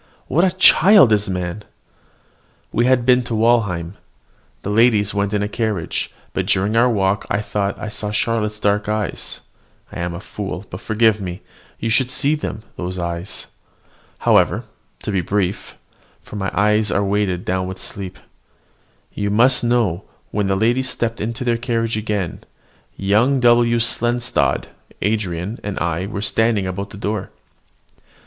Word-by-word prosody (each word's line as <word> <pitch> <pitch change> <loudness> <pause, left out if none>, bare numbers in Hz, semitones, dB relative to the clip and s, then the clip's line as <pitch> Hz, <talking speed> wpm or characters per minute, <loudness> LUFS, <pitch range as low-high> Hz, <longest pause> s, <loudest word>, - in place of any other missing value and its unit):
What 165 +6 +2
a 185 -1 +1
child 185 - +7
is 105 -1 +2
man! 90 +2 -3 1.1
We 120 +2 +2
had 130 -2 +3
been 125 0 +5
to 115 - -3
Walheim: 105 -6 +1 0.7
the 100 - -2
ladies 105 -2 +3
went 100 -1 0
in 105 -1 0
a - - -1
carriage; 105 -5 -2 0.2
but - - -2
during 100 +4 +1
our 120 +2 +5
walk 100 -3 0
I 100 - +1
thought 100 -2 -2
I 110 - -4
saw 105 0 -5
in 105 - -4
Charlotte's 105 -1 0
dark 105 +1 +1
eyes 105 -3 -3 0.5
I - - -7
am 85 0 -3
a - - -6
fool 100 -1 -6
but 90 - -7
forgive 110 -2 +2
me! 90 -1 -6 0.4
you 115 - -1
should 125 +3 +2
see 140 +3 +1
them, 150 -7 -4
those 90 +1 -4
eyes. 85 +1 -4 0.7
However, - - +3 0.4
to - - -2
be 95 -2 +1
brief 100 +1 -2 0.5
(for - - -11
my 95 -2 -2
own - - -12
eyes 105 +1 +3
are 100 +1 +1
weighed 100 -3 0
down 95 0 -1
with 95 0 -7
sleep), 95 -2 -7 1.0
you 100 0 -2
must 120 +5 +4
know, 115 -7 +1 0.3
when 105 -2 0
the 95 - +1
ladies 120 +5 +1
stepped 115 -2 -2
into 115 +3 -3
their 120 -2 +1
carriage 115 -2 -1
again, 105 -5 -2 0.6
young 110 +8 +2
W. 120 -1 +4
Seldstadt, 120 +1 +1 0.3
Andran, 100 -1 -2
and 100 -1 -5
I 85 +2 -1
were 100 -1 -4
standing 110 -2 +2
about 100 +2 -4
the 105 - -10
door. 105 -1 -3
105 Hz, 160 wpm, -20 LUFS, 95-115 Hz, 1.1 s, child